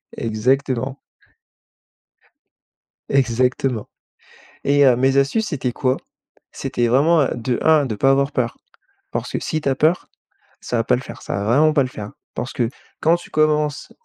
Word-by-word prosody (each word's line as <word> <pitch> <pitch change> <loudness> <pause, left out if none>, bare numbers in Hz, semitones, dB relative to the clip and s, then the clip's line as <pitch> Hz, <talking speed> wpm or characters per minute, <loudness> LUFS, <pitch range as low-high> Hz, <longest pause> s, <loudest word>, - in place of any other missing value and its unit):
Exactement. 130 +3 -1 2.1
Exactement 125 -2 +1 0.8
et 145 0 +4
heu, 125 -2 +6
mes 135 +2 +2
astuces 145 +11 +2
c'était 130 - -2
quoi? 130 -1 0 0.6
C'était 125 -3 -1
vraiment, 150 +7 +4
heu, - - 0
de 120 +1 -2
1 155 -3 +4
de 110 -4 -3
pas 135 +6 +3
avoir 140 +1 +2
peur, 120 -3 -1 0.5
parce - - -3
que - - -2
si 155 - -2
tu 140 - -4
as 135 - +1
peur, 155 +6 +1 0.5
ça 120 - -2
va 115 - +1
pas - - +3
le 125 - -4
faire, - - -10
ça - - -4
va 100 - -3
vraiment 150 +7 +4
pas 140 - +3
le 130 - -4
faire 105 -5 -7
hein, - - -14 0.2
parce 125 - -4
que 120 -2 0 0.3
quand 165 +2 +4
tu 175 - -13
commences, 150 -1 +1
135 Hz, 170 wpm, -20 LUFS, 125-150 Hz, 2.1 s, heu